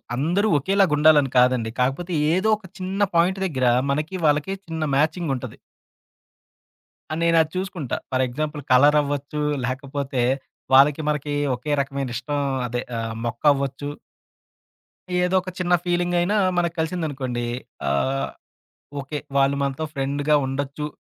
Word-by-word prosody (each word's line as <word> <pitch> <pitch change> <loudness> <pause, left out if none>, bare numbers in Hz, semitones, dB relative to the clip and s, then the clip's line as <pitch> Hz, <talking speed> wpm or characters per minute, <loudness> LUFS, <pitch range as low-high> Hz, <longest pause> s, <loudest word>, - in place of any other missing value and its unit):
అందరూ 175 - +1
ఒకేలాగుండాలని 150 -4 +4
కాదండి. 125 -2 +3
కాకపోతే 135 +8 0 0.2
ఏదో 190 +5 +2
ఒక 210 - -17
చిన్న 190 +2 -3
పాయింట్ 180 +3 +3
దగ్గర 130 -8 0 0.2
మనకి, 150 +6 -2
వాళ్ళకీ 150 +5 +2
చిన్న 160 -1 -3
మ్యాచింగుంటది. 155 -3 -1 1.5
ఆ - - -1
నేను 170 0 +4
అది 160 0 -2
చూసుకుంటా. 185 -7 -3
ఫర్ 130 0 +2
ఎగ్జాంపుల్ 150 +4 -4
కలర్ 145 +4 +6
అవ్వచ్చు. 145 +1 -3 0.2
లేకపోతే 135 0 -3 0.5
వాళ్ళకి 140 +3 +6
మనకి 150 -1 -2 0.2
ఒకే 140 +5 -5
రకమైన 140 -1 -3
ఇష్టం 145 +5 -2 0.3
అదే 120 +1 -2 0.2
ఆహ్, 115 0 -4
మొక్కవ్వచ్చు. 140 +3 0 1.3
ఏదో 180 +1 +1
ఒక 185 - -7
చిన్న 180 -1 +1
ఫీలింగయినా 175 +2 +1 0.2
మనకు 170 -1 0
కలిసిందనుకోండి. 145 -7 -2 0.5
ఆహ్, 130 - 0 0.7
ఓకే. 145 +2 -5 0.2
వాళ్ళు 140 0 +3
మనతో 140 +3 -2
ఫ్రెండ్‌గా 145 +1 +1
ఉండొచ్చు. 140 +2 -3
145 Hz, 120 wpm, -23 LUFS, 135-170 Hz, 1.5 s, కలర్